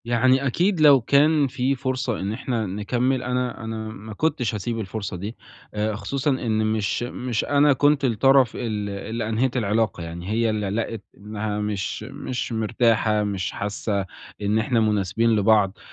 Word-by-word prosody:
يعني 130 +3 +3
أكيد 175 - +1
لو 145 -4 +7
كان 145 +4 +4
في 130 +1 0
فرصة 130 -3 -2
إن 100 +2 -2
إحنا 115 -1 -2
نكمّل 120 +7 -1
أنا 125 -2 -2
أنا 110 0 -5
ما 110 0 -9
كنتش 125 -3 -1
هاسيب 115 +3 -3
الفرصة 100 -2 -4
دي، 105 +6 -6 0.4
آآ 105 0 -1
خصوصًا 135 +8 -2
إن 110 -4 0
مش 110 +1 0
مش 120 -1 -3
أنا 145 0 +4
كنت 145 +1 +3
الطَّرَف 130 +1 +4
ال 105 -4 -3
اللي 110 +3 -4
أنهيت 120 +3 0
العلاقة، 110 -4 0
يعني 85 +2 -7
هي 115 +1 +1
اللي 105 -2 -1
لقِت 115 +1 -3 0.2
إنها 105 0 -4
مش 105 -3 -3
مش 125 -1 -5
مرتاحة، 110 -1 +1
مش 100 -3 -2
حاسّة 100 -1 -2 0.4
إن 105 +2 +1
إحنا 115 +2 +1
مناسبين 110 +1 +2
لبعض، 105 -2 +3
110 Hz, 160 wpm, -23 LUFS, 105-125 Hz, 0.4 s, لو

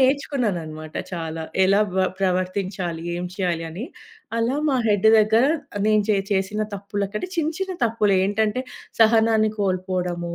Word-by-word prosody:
నేర్చుకున్నాననమాట 205 - -1 0.2
చాలా. 165 -1 -4 0.2
ఎలా 200 +2 +4 0.2
వ 185 - +3
ప్రవర్తించాలి, 185 -2 -1
ఏం 180 +1 -3
చేయాలి 170 -4 -1
అని. 205 - -6 0.5
అలా 235 +4 +1
మా 260 - +2
హెడ్డు 210 +1 +4
దగ్గర 220 +3 +4 0.4
నేను 215 -1 +4
చే 200 - +3
చేసిన 195 +2 -1 0.2
తప్పులకంటే 200 - -4
చిన్న, 320 0 0
చిన్న 380 -1 -2
తప్పులు 215 -3 +1
ఏంటంటే, 215 +4 0 0.4
సహనాన్ని 220 -1 +4
కోల్పోవడము, 180 -2 -2
200 Hz, 130 wpm, -23 LUFS, 180-220 Hz, 0.5 s, ఎలా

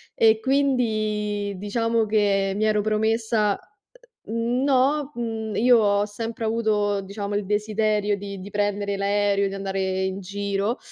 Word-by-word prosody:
e 220 -1 +4
quindi 215 -6 0
diciamo 230 +3 0
che 200 -2 +2
mi 215 +2 +1
ero 215 -1 +2
promessa 215 0 +1 0.7
No, 260 +5 +1
mhmm, 225 -2 -4
io 245 +1 +5
ho 205 -1 +2
sempre 225 +2 -5
avuto, 210 -3 +1
diciamo, 200 +1 -5
il 205 - 0
desiderio 210 0 0
di 200 0 -7
di 190 +2 -8
prendere 205 0 -1
l'aereo, 200 0 +1
di 195 - -5
andare 190 -1 -2
in 190 +1 -3
giro, 200 +3 -2
210 Hz, 130 wpm, -24 LUFS, 200-225 Hz, 0.7 s, io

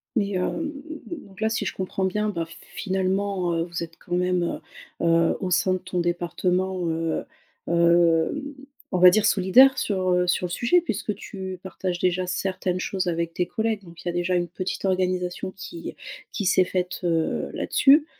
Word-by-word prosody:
Mais 205 -4 +1
hem, 245 - -1 0.4
donc 210 - -9
là 220 - +2
si 220 - -1
je - - -2
comprends 190 0 -2
bien 210 +3 0
bah, 170 -5 -2
f 165 0 -14 0.2
finalement, 190 -1 0
heu, 165 - +1
vous 170 0 -5
êtes 165 0 -9
quand 175 - -8
même, 180 0 +1 0.6
heu - - +1
heu, 165 0 +4
au 185 - -2
sein 180 +1 +2
de 185 - -1
ton 180 0 -3
département, 180 +1 0
heu, 165 0 -1 0.4
hem 170 - +3 0.5
on - - +2
va 180 0 +10
dire 205 +3 +3
solidaires 245 +9 +6
sur, 185 -3 0
heu, 180 0 +2
sur 180 +1 +1
le 175 - -4
sujet. 240 - +3
Puisque 210 - -3
tu 190 -2 -7
partages 185 -1 -3
déjà 180 +1 0
certaines 185 -1 -1
choses 190 0 -2
avec 170 -1 -1
tes 180 0 -1
collègues. 220 +1 -1
Donc 170 -2 -13
il - - -3
y - - +2
a - - -9
déjà 175 +1 0
une 175 -1 +1
petite 185 +2 -4
organisation 185 -1 0
qui 170 -3 -8 0.4
qui 205 - -3
s'est 185 0 +5
faite, 180 0 -2
heu, 165 -2 0
là-dessus, 290 +2 +4
185 Hz, 190 wpm, -25 LUFS, 175-195 Hz, 0.6 s, va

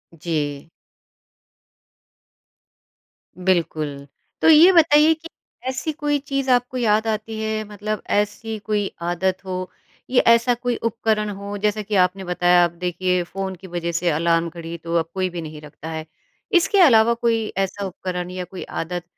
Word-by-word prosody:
जी। 150 -2 -3 2.8
बिल्कुल। 155 -5 0 0.4
तो - - +5
ये 325 +4 +8
बताइए 310 -1 +6
कि 325 +1 -11 0.4
ऐसी 265 +4 -2
कोई 295 -1 0
चीज़ 275 -1 -3
आपको 245 +1 +1
याद 220 -1 +2
आती 220 0 -3
है, 220 0 -2
मतलब 210 +1 -4 0.2
ऐसी 220 +2 -2
कोई 205 -2 0
आदत 185 +2 -1
हो 185 -1 -4 0.4
या 255 - +4
ऐसा 235 +1 +3
कोई 245 0 -2
उपकरण 220 -2 -1
हो, 200 +1 -6
जैसा 210 +1 0
कि 210 0 -3
आपने 190 +1 -2
बताया 175 0 +3
अब 170 - -3
देखिए 180 0 0
फ़ोन 190 +1 -5
की 190 +2 -12
वजह 170 -1 -3
से 170 +1 0
अलार्म 165 +1 +1
घड़ी 170 0 -7
तो 165 +1 -5
अब 165 0 -4
कोई 185 -1 -1
भी 175 -1 -6
नहीं 155 -1 -8
रखता 150 +1 -10
है। 160 0 -5 0.5
इसके 385 +3 +2
अलावा 235 -6 +6
कोई 230 -2 0
ऐसा 195 +1 -1
उपकरण 180 -1 -5
या 185 0 -4
कोई 180 +1 -8
आदत 175 +1 -4
195 Hz, 155 wpm, -22 LUFS, 175-225 Hz, 2.8 s, ये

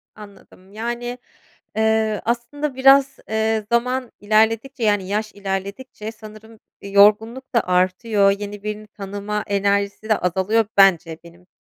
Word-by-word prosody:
Anladım. 200 -2 -16
Yani, 240 +2 -4 0.6
eee, 220 -1 +1
aslında 250 +5 -3
biraz, 270 +1 +4
eee, 220 0 0
zaman 250 +1 0
ilerledikçe 225 +5 +1
yani 205 -3 +1
yaş 215 +1 -2
ilerledikçe 200 +4 -6
sanırım, 215 0 -14 0.2
eee, 200 - -9
yorgunluk 220 +6 +3
da 235 - +5
artıyor, 195 +3 +2
yeni 205 0 -7
birini 210 0 -5
tanıma 205 +1 -5
enerjisi 200 +1 -1
de 215 - +2
azalıyor 190 +5 +1
bence 175 -4 +4
benim 175 +1 -17
215 Hz, 125 wpm, -21 LUFS, 200-230 Hz, 0.6 s, da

